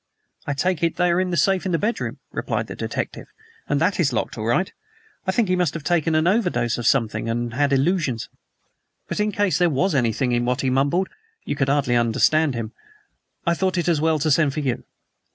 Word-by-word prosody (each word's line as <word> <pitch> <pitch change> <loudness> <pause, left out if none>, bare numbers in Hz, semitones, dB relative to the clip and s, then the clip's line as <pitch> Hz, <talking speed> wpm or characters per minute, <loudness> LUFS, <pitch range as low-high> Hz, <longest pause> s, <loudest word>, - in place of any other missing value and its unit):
"I 145 - 0
take 180 +3 0
it 165 -1 +1
they 180 -1 +2
are 175 +2 +2
in 185 - -1
the 175 - -1
safe 190 +3 +2
in 185 - -2
his 165 - +2
bedroom," 225 +3 -2
replied - - -2
the - - -8
detective, - - -4 0.4
"and 145 - +2
that 185 +5 +1
is 150 -5 +3
locked 120 - -2
all 110 - -4
right. 175 +11 +1 0.5
I - - +3
think 215 +2 +1
he 185 - +2
must 175 -4 0
have 165 - -5
taken 165 -1 +1
an 155 +1 +2
overdose 175 - +1
of 120 - -1
something 115 -3 +1
and 120 +1 -2
had 140 +2 +1
illusions. 140 - +1 0.8
But - - -3
in 210 0 +1
case 205 -3 +1
there 175 -1 +4
was 165 +6 +1
anything 125 -1 +1
in 120 0 +1
what 125 +2 0
he 130 - 0
mumbled 140 +8 +1 0.4
(you - - -2
could 135 -1 0
hardly 140 -3 +2
understand 130 +5 +2
him) 115 -1 -4 0.7
I 170 - +3
thought 185 +1 0
it 175 - 0
as 165 -4 +2
well 160 0 +2
to 155 +1 0
send 145 -1 +3
for 155 - -1
you." 130 -4 -2
155 Hz, 225 wpm, -22 LUFS, 130-180 Hz, 0.8 s, there